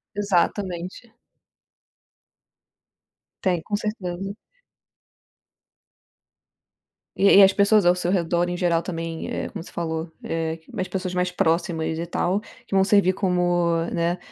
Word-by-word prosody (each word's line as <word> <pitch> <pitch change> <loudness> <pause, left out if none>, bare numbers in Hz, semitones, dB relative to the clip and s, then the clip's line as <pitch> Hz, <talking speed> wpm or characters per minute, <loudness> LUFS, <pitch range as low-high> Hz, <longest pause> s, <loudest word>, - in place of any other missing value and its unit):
Exatamente. 190 +1 -1 2.3
Tem, 180 -4 +1
com 205 - -3
certeza. 195 -3 -4 2.8
E 200 0 +6
e 200 - +10
as 195 0 +6
pessoas 200 0 +4
ao 175 0 +5
seu 180 0 -1
redor 175 -1 +1
em 175 - -3
geral 170 -2 +1
também 165 -2 -5
é - - -3
como - - -7
você - - -12
falou, 160 -1 -4
eh, 165 0 -3
mais 185 - -3
pessoas 185 -1 -4
mais 180 0 0
próximas 165 -1 0
e 170 - -2
tal 180 +3 0 0.3
que - - -9
vão 190 0 +5
servir 195 -2 +4
como, 180 -2 +1 0.3
né, 170 +1 0
180 Hz, 125 wpm, -23 LUFS, 170-195 Hz, 2.8 s, e